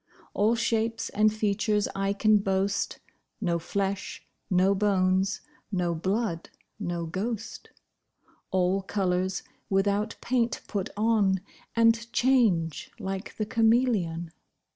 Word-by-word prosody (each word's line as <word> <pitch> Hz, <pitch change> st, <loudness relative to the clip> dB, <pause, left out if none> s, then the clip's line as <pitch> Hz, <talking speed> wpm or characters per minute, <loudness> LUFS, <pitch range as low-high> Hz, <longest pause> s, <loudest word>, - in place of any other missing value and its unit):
All 215 Hz, +3 st, +3 dB
shapes 230 Hz, -1 st, 0 dB
and 215 Hz, +1 st, +3 dB
features 210 Hz, 0 st, +1 dB
I 195 Hz, 0 st, 0 dB
can 215 Hz, +1 st, +4 dB
boast, 195 Hz, 0 st, 0 dB, 0.4 s
No 175 Hz, -6 st, 0 dB
flesh, 195 Hz, +3 st, -3 dB, 0.2 s
no 185 Hz, +1 st, +4 dB
bones, 190 Hz, -1 st, +1 dB, 0.3 s
no 180 Hz, -3 st, 0 dB
blood 190 Hz, +1 st, -2 dB, 0.3 s
no 175 Hz, -4 st, -3 dB
ghost: 225 Hz, +6 st, -4 dB, 0.8 s
All 185 Hz, +1 st, +1 dB
colours, 185 Hz, -1 st, -1 dB, 0.3 s
without 200 Hz, +3 st, +1 dB
paint, 240 Hz, -1 st, 0 dB
put 200 Hz, -4 st, -3 dB
on, 210 Hz, -4 st, +2 dB, 0.3 s
And 230 Hz, 0 st, +3 dB
change 220 Hz, -, +2 dB
like 190 Hz, +1 st, -5 dB
the 215 Hz, -, -1 dB
cameleon. 220 Hz, -8 st, +2 dB
200 Hz, 105 wpm, -27 LUFS, 185-225 Hz, 0.8 s, can